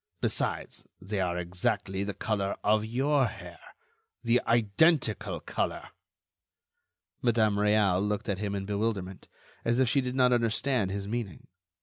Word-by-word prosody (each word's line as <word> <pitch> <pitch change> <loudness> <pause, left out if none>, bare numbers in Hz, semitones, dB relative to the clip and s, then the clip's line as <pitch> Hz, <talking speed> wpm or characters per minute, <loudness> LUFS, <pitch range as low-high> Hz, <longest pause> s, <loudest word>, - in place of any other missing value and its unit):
Besides, - - -1
they 100 +2 -4
are 90 -1 -1
exactly 90 +2 -1
the 100 0 -4
color 100 -3 -1
of 105 0 +3
your 135 +4 +1
hair—the 115 +3 -5
identical 115 - +2
color." - - -3 1.3
Madame 110 -4 +2
Réal 105 -2 +3
looked 105 +2 -2
at 100 -3 -1
him 100 -1 -2
in 100 -1 -3
bewilderment, 100 -2 -3 0.4
as 115 +2 +1
if 130 - +4
she 135 +4 +2
did 125 0 -4
not 125 -1 +4
understand 115 -1 +1
his 100 +1 -4
meaning. 115 -2 -4
105 Hz, 130 wpm, -29 LUFS, 100-120 Hz, 1.3 s, if